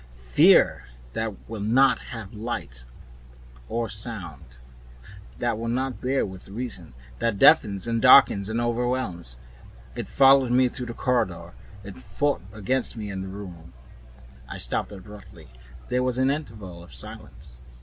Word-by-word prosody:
Fear - - +4 0.3
that 110 -3 -4
will 110 -2 -6
not 125 +6 +4
have 110 -5 -8
light 105 - -5 0.8
nor 115 0 -1
sound, 100 - -8 0.8
that 120 -2 -1
will 115 - -4
not 130 +2 -2
bear 135 +2 0
with 95 -1 -10
reason, 100 - -4 0.2
that 115 -3 0
deafens 105 -7 +5
and 115 -1 -1
darkens 125 -6 +6
and 110 +1 -1
overwhelms. 120 - -2 0.6
It - - -5
followed 135 -1 +5
me 125 0 +4
through 125 0 -6
the 115 - -7
corridor, 90 -9 -1 0.3
it 100 -1 -9
fought 145 +2 -1
against 115 +5 -1
me 105 -2 -5
in 95 -1 -5
the 95 - -6
room 90 -7 -10 0.4
" - - -22 0.3
I - - -6
stopped - - +1
abruptly. 105 -4 -13 0.4
There 125 - +1
was 125 -1 0
an 130 +1 +3
interval 105 - -6
of 70 -7 -11
silence. 65 +1 -9
110 Hz, 145 wpm, -25 LUFS, 95-125 Hz, 0.8 s, darkens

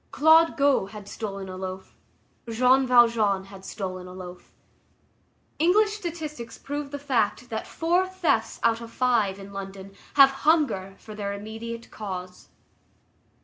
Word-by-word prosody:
Claude 320 +2 +5
Gaux 280 -8 +3
had 210 -1 -10
stolen 195 -3 -6
a 185 - -7
loaf; 185 0 -7 0.6
Jean 255 +3 +4
Valjean 230 -5 +4
had 195 -1 -13
stolen 185 -2 -6
a 180 - -10
loaf. 180 -1 -10 1.1
English 410 +6 +4
statistics 315 - -6
prove 290 0 -5
the 285 - -5
fact 250 -3 -1
that 220 - -4
four 350 +3 +1
thefts 345 -12 0
out 230 0 +2
of 230 - -8
five 230 -7 +1
in 200 0 -11
London 195 0 -8 0.2
have 275 -1 +8
hunger 280 - +2
for 215 - -11
their 200 -1 -4
immediate 225 +3 -7
cause. 185 -3 -7
225 Hz, 140 wpm, -26 LUFS, 195-285 Hz, 1.1 s, have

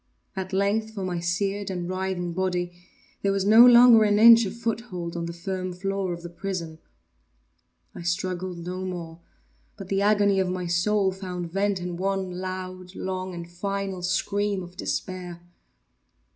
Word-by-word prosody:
At 190 -1 -4
length 210 +3 0
for 195 - -4
my 175 -2 -2
seared 195 +4 -1
and 180 -2 -3
writhing 185 -2 -3
body 180 -1 -1 0.5
there 200 - +1
was 195 -1 0
no 220 +3 +8
longer 240 -2 +8
an 205 -1 +3
inch 230 +1 +8
of 200 - -6
foothold 215 -7 -4
on 170 -1 -3
the - - -4
firm 185 +1 -4
floor 195 0 -2
of 170 0 -6
the 175 - -6
prison. 170 -3 -5 1.1
I - - -8
struggled 180 +1 -2
no 185 +1 -4
more, 170 -3 -6 0.6
but 190 - -9
the 195 0 +1
agony 205 -1 +3
of 190 -1 +1
my 180 0 -3
soul 190 +3 +1
found 180 -3 -6
vent 195 +1 0
in 175 -1 -5
one 190 0 -1
loud, 185 0 -6
long, 185 -1 -4
and 170 0 -7
final 195 +1 -4
scream 195 +2 -1
of 175 +1 -12
despair. 180 -2 -4
185 Hz, 160 wpm, -25 LUFS, 175-200 Hz, 1.1 s, no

